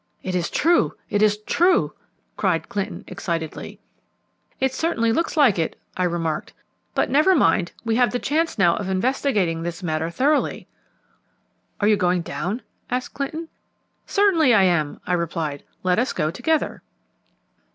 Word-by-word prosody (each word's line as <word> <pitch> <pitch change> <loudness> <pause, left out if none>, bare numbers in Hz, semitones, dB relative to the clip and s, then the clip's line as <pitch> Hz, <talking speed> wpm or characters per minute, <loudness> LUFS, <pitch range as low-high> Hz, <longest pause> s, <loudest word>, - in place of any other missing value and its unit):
"It 185 - -3
is 175 -2 0
true! 340 +3 +2 0.2
It 205 - +1
is 210 -1 +4
true!" 345 - +2 0.4
cried 180 -5 0
Clinton 200 -1 -4
excitedly. 170 -4 -5 0.8
"It 265 0 +1
certainly 265 -7 +1
looks 335 +6 -1
like 255 - +5
it," 160 - -2 0.2
I 185 - 0
remarked: 165 -3 -2 0.4
"but - - +1
never 310 +7 +5
mind, 175 - +3
we 225 0 +1
have 245 -1 +4
the 245 - -1
chance 315 +5 0
now 175 -4 +4
of 195 -2 -4
investigating 190 - 0
this 170 +1 -5
matter 160 -1 -1
thoroughly." 280 - 0 1.1
"Are 205 - +2
you 210 -1 +4
going 180 -2 +1
down?" 190 +10 -4 0.3
asked 250 0 -2
Clinton. 315 +4 -4 0.6
"Certainly 335 - +4
I 200 - +5
am," 165 -5 +1
I 180 - -1
replied. 165 -4 -2 0.2
"Let 180 +1 +2
us 250 - 0
go 155 -2 0
together." 310 - -1
205 Hz, 150 wpm, -23 LUFS, 170-270 Hz, 1.1 s, like